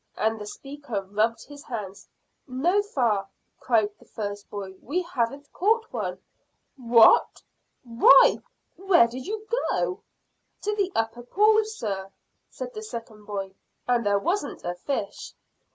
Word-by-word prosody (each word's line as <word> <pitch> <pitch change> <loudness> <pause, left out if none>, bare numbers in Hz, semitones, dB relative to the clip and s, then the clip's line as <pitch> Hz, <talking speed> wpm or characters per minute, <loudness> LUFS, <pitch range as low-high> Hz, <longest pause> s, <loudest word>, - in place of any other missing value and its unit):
And 220 0 0
the 210 - -6
speaker 275 -4 -6
rubbed 215 +4 0
his 290 -1 -12
hands. 205 -5 -7 0.4
"No, 330 +11 +2
fa," 235 - 0 0.3
cried 220 -4 +2
the - - -19
first 205 -1 -6
boy. 195 -2 -6
"We 350 +8 -2
haven't 280 -3 -3
caught 445 +4 +1
one." 185 -6 -3 0.6
"What! 235 -4 +5 0.4
Why, 240 +3 +6 0.4
where 375 -9 +5
did 255 +6 -8
you 430 +1 -4 0.2
go?" 380 +3 -1 0.6
"To 420 +1 0
the 395 -2 0
upper 225 +1 -1
pool, 425 - +4
sir," 200 - -4 0.4
said - - -7
the 430 - -6
second 230 - -8
boy, 195 -2 -5 0.3
"and 245 -1 +2
there 205 -1 +2
wasn't 340 - -2
a 175 - -2
fish." 205 +2 -4
240 Hz, 135 wpm, -26 LUFS, -, 0.6 s, Why